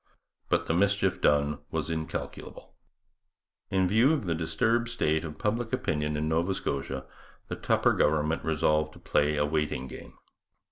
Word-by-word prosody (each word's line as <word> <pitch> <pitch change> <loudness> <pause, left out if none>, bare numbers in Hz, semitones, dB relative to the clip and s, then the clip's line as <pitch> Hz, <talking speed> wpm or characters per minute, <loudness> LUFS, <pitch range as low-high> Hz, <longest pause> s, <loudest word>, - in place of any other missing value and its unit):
But - - +2
the - - 0
mischief 100 +1 +2
done 75 0 +2
was 80 0 -2
incalculable. 80 -1 -6 1.0
In 95 -1 +2
view 115 - +4
of 140 -9 -1
the 85 - 0
disturbed 110 +9 0
state 80 -9 0
of 75 -2 -7
public 115 +2 -1
opinion 75 -11 -1
in 75 +1 -1
Nova 85 +4 +1
Scotia 70 -3 -3 0.4
the - - -2
Tupper - - +2
government 75 +1 +1
resolved 75 0 +1
to - - -14
play 75 +1 +1
a 75 - +2
waiting 75 -4 -1
game. - - -11
80 Hz, 150 wpm, -28 LUFS, 75-95 Hz, 1.0 s, view